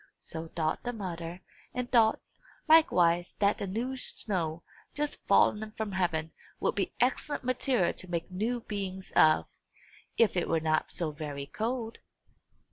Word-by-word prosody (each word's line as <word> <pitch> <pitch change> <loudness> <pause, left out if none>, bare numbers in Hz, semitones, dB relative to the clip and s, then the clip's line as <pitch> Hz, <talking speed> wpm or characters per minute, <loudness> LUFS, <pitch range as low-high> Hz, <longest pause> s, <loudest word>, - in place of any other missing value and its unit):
So 165 0 -7
thought 160 -1 -1
the 245 - -3
mother; 175 -4 -5 0.3
and 250 0 -3
thought, 225 -3 +5 0.5
likewise, 175 - +5
that 200 0 +2
the 200 - -2
new 235 +7 -2
snow, 170 -10 -2 0.3
just 295 0 -2
fallen 215 0 +3
from 220 -2 -2
heaven, 170 -4 0 0.3
would - - +1
be 200 - -2
excellent 260 +4 0
material 255 -5 +1
to 185 - -6
make 170 +1 -3
new 230 +6 -1
beings 190 -3 -5
of, 155 0 +6 0.7
if 225 -4 +4
it 175 - 0
were 165 - +2
not 155 0 0
so 165 -3 -2
very 145 -2 -5
cold. 225 - -3
190 Hz, 145 wpm, -30 LUFS, 165-230 Hz, 0.7 s, of